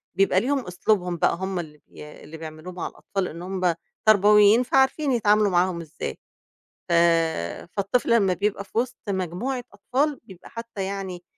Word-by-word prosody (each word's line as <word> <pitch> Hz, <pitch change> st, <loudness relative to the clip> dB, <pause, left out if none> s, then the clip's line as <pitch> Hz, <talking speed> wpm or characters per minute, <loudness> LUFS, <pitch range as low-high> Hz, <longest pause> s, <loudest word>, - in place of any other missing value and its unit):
بيبقى 195 Hz, 0 st, +3 dB
ليهم 270 Hz, +2 st, -1 dB
أسلوبهم 180 Hz, -1 st, 0 dB
بقى -, -, +2 dB
هُم 190 Hz, +1 st, -3 dB
اللي 150 Hz, -3 st, -8 dB
بي 150 Hz, 0 st, -12 dB
اللي 155 Hz, +2 st, -10 dB
بيعملوه 160 Hz, +2 st, -9 dB
مع 180 Hz, -, -4 dB
الأطفال 195 Hz, -2 st, -4 dB
إن 165 Hz, +2 st, -8 dB
هُم 185 Hz, -1 st, 0 dB, 0.3 s
تربويين 210 Hz, +2 st, +6 dB
فعارفين 265 Hz, +3 st, +2 dB
يتعاملوا 210 Hz, -3 st, +3 dB
معاهم 175 Hz, -1 st, +1 dB
إزاي، 160 Hz, -1 st, -6 dB, 0.7 s
ف -, -, +1 dB, 0.8 s
فالطفل 230 Hz, +4 st, +2 dB
لمّا 195 Hz, -4 st, +2 dB
بيبقى 200 Hz, +2 st, -1 dB
في 195 Hz, -, -9 dB
وسط 240 Hz, -2 st, -2 dB
مجموعة 195 Hz, +8 st, -2 dB
أطفال، 270 Hz, +8 st, -1 dB
بيبقى 190 Hz, -5 st, -14 dB
حتّى 230 Hz, -3 st, -6 dB
يعني 190 Hz, -2 st, -5 dB
195 Hz, 155 wpm, -24 LUFS, 180-230 Hz, 0.8 s, تربويين